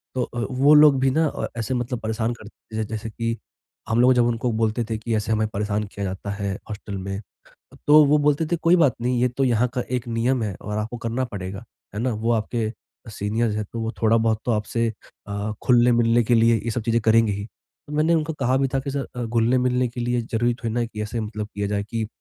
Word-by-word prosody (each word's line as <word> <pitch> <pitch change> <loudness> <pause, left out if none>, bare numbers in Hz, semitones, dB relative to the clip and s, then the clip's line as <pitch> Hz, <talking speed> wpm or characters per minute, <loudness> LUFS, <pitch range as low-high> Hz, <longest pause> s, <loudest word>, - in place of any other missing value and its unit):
तो 125 - +1
अ, 120 - -5
वो 135 +3 +5
लोग 150 -3 +7
भी 135 0 +3
ना 160 +3 +2
अ, - - -3
ऐसे 115 +3 -2
मतलब 120 -1 -2
परेशान 110 +1 -1
करते 110 -1 -11
थे - - -2
जैसे 110 +1 -5
कि, 115 +1 -3 0.5
हम 115 +2 +3
लोग 130 +1 +6
जब 120 -1 +4
उनको 120 +1 0
बोलते 110 +1 0
थे 110 - -1
कि 110 +1 -2
ऐसे 105 +1 -1
हमें 110 0 +2
परेशान 105 0 -1
किया 100 - -4
जाता 95 +2 -4
है 100 -1 -3 0.2
हॉस्टल 105 -1 -6
में। 95 +2 -5 0.7
तो 150 +1 +8
वो 145 +2 +4
बोलते 150 +2 +2
थे 170 - +1
कोई 170 +2 +6
बात 145 -7 +4
नहीं 125 0 0
ये 125 - +4
तो 125 +3 -1
यहाँ 125 -1 +3
का 125 - -1
एक 125 -1 -2
नियम 120 +2 0
है 100 -3 -3
और 105 +1 -4
आपको 110 +3 -4
करना 115 +3 -1
पड़ेगा, 100 -1 -6 0.3
है - - -2
ना? 125 -2 0
वो 115 +2 -1
आपके 110 0 -1 0.4
सीनियर्स 105 +2 -1
है, 105 - -1
तो 115 +3 -7
वो 115 0 -2
थोड़ा-बहुत 110 0 +3
तो 120 - +1
आपसे 115 +2 0 0.4
अ, 100 +1 -3
घुलने-मिलने 120 -1 +4
के 120 +2 +3
लिए 115 -1 +4
ये 115 - 0
सब 120 - -2
चीज़ें 115 0 +1
करेंगे 115 -1 +4
ही। 100 +1 -4 0.4
तो 150 - -7
मैंने 155 +3 +3
उनको 160 0 -1
कहा 130 -2 +1
भी 135 - +2
था 135 - +2
कि 140 +1 -4
सर 140 0 -3
अ, 125 - -3
घुलने-मिलने 125 +2 +2
के 120 +1 -8
लिए 120 0 0
ज़रूरी 120 +1 0
थोड़ी 115 -2 -4
ना 120 - 0
है 120 - 0
कि 105 -2 -6
ऐसे 110 +2 -4
मतलब 105 -1 -5
किया 100 0 -1
जाए 100 0 -1
कि 110 0 -3
115 Hz, 240 wpm, -23 LUFS, 110-125 Hz, 0.7 s, तो